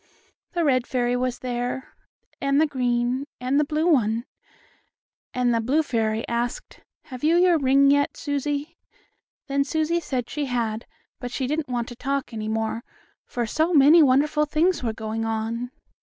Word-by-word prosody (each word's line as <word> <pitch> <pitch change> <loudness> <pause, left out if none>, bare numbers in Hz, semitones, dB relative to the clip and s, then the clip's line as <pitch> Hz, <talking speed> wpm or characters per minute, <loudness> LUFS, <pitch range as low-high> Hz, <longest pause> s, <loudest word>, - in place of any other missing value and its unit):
The 345 -1 0
red 255 -5 +2
fairy 245 -1 0
was 250 0 -1
there, 245 +1 -4 0.5
and 275 +1 +2
the 315 - +5
green, 250 -1 -1
and 255 +3 +1
the - - +4
blue 305 +2 -1
one. 235 -8 +2 1.1
And 250 -1 +1
the 230 - +1
blue 280 +8 +2
fairy 225 -4 -1
asked: 235 0 -3 0.2
"Have 255 -2 -10
you 320 +2 +4
your 355 -2 +4
ring 275 +1 +4
yet, 285 0 +1
Susie?" 290 +3 -3 0.7
Then 280 0 +1
Susie 315 +3 0
said 255 -7 -3
she 295 -1 -3
had, 230 -3 -2 0.3
but 245 - -5
she 260 +2 -3
didn't 300 +1 -2
want 240 -1 -2
to 240 - -9
talk 275 0 -3
any 215 -1 -4
more, 220 +1 -2 0.4
for 240 -1 -2
so 315 +8 0
many 300 +4 +7
wonderful 295 +2 +3
things 330 +4 +1
were 235 -3 -1
going 220 0 -4
on. 225 +2 -2
255 Hz, 165 wpm, -24 LUFS, 240-295 Hz, 1.1 s, many